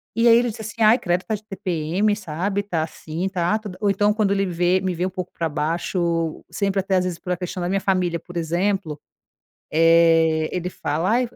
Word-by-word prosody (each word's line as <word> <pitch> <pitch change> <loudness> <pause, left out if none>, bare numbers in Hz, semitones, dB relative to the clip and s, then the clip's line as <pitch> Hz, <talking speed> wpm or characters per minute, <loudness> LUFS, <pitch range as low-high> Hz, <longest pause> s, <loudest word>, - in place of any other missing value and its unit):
E, 230 +1 +3
aí 230 0 +8
ele 240 0 +2
disse 220 - -9
assim: 220 +1 -7
"Ai, 220 +4 +6
credo, 175 +1 0
tá 220 - -2
de 215 - -10
TPM", 190 +1 -1
sabe, 195 +2 -2
"Tá 170 -6 -1
assim, 165 +3 -5
tá", 180 +2 0
todo 205 -4 -8
ou 205 - +2
então, 205 +2 +2
quando 210 -2 +1
ele 195 0 +1
vê 180 +1 +1
me 185 -1 -1
vê 175 - -2
um - - -1
pouco 185 -1 -6
pra 165 -1 -2
baixo, 165 +1 -1
sempre, 195 -1 0
até 190 0 0
às 185 - +1
vezes, 175 -2 -3
por 180 - -5
a - - -3
questão 180 0 -5
da 175 - -1
minha 195 0 0
família, 180 -3 0
por 175 -1 -9
exemplo, 170 -1 -1 0.7
eh, 165 -1 +4
ele 180 0 -2
fala: 165 +2 -2
"Ai 245 +1 +2
fo, - - -22
180 Hz, 225 wpm, -22 LUFS, 165-200 Hz, 0.7 s, aí